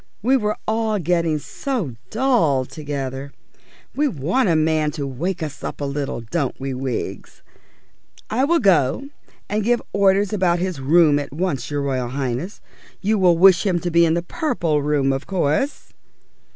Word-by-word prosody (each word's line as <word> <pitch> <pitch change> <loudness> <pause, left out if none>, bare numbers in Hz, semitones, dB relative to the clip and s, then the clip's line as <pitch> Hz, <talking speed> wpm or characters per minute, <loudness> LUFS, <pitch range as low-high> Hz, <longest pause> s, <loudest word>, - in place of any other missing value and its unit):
We 260 +4 +4
were 210 -4 0
all 220 -1 0
getting 170 -3 +1
so 200 - -4 0.2
dull 220 - +2
together! 140 -1 -5 0.6
We 295 +2 +2
want 185 - 0
a 165 - +3
man 155 -1 +2
to 145 -3 -4
wake 165 +7 -3
us 150 -3 -6
up - - -5
a 145 - -2
little, 140 -3 -3
don't 135 +4 -3
we, 135 0 -3
Wiggs? 130 -1 -5 0.8
I 245 +5 0
will 340 +4 +3
go 195 - +2 0.4
and 210 +1 -1
give 240 +2 +2
orders 200 +1 +3
about 185 -4 +2
his 180 -3 -3
room 150 +1 +4
at 145 - -6
once, 155 -2 -2
your 145 -1 -2
Royal 130 -3 -1
Highness. 135 - -4 0.4
You 210 +2 +1
will 180 -3 +4
wish 185 0 +6
him 190 -4 +1
to 175 - -2
be 170 +1 +5
in 165 -1 +3
the 170 - -1
Purple 175 - -1
Room, 140 -2 +1
of 135 +2 -4
course?" 190 - -1
170 Hz, 165 wpm, -21 LUFS, 140-200 Hz, 0.8 s, wish